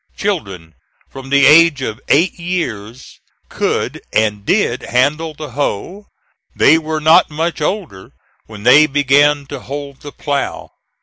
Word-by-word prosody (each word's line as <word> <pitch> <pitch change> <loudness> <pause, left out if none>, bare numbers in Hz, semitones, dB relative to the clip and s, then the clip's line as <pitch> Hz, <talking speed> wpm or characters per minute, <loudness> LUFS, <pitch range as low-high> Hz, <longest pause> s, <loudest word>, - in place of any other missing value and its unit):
Children 100 - -4 0.4
from 135 0 -10
the 140 0 +4
age 155 -3 +5
of 110 -3 -5
eight 165 +6 +2
years 130 - -5 0.3
could - - -3
and 105 -2 0
did 130 - 0
handle 150 +5 -1
the 150 -2 -9
hoe; 145 - -4 0.5
they 160 +3 +4
were 155 0 -4
not 160 +2 +4
much 160 +2 -3
older 150 - -4 0.4
when 105 -2 -11
they 145 +6 +6
began 145 +1 +2
to 140 0 -8
hold 140 +1 -8
the 145 - -9
plough. 140 -1 -4
145 Hz, 135 wpm, -16 LUFS, 125-160 Hz, 0.5 s, they